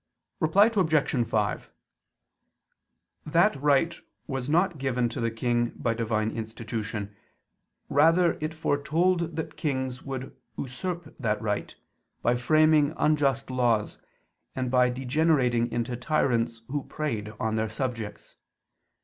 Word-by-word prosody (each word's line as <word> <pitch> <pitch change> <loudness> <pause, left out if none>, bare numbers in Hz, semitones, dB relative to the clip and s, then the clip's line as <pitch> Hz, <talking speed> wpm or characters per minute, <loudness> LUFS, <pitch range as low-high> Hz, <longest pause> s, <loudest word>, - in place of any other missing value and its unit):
Reply 200 +8 +4
Obj. 155 - +2
5: 105 -2 -1 1.5
That 170 +6 +3
right 145 +4 +2 0.3
was 135 0 -3
not 175 0 +2
given 125 -3 0
to 120 - -5
the 115 - +1
king 120 +1 0
by 115 - -1
Divine 110 -1 -1
institution: 110 -2 -5 0.7
rather 165 +5 +4
was - - -3
it 155 +1 -2
foretold 165 +3 +1
that 160 - -4
kings 130 -4 -2
would 135 -1 -6 0.2
usurp 160 +5 -5
that 110 -5 0
right, 105 -2 -3 0.5
by 120 - +3
framing 155 +3 +4
unjust 140 -4 +1
laws, 120 -5 +1 0.6
and 130 -1 -2
by 125 -1 +4
degenerating 125 -2 +1
into 120 +1 -2
tyrants 120 -4 0
who 145 +1 -1
preyed 110 -8 -4
on 110 -1 -1
their 110 0 0
subjects. 115 -3 -5
130 Hz, 120 wpm, -27 LUFS, 115-155 Hz, 1.5 s, Reply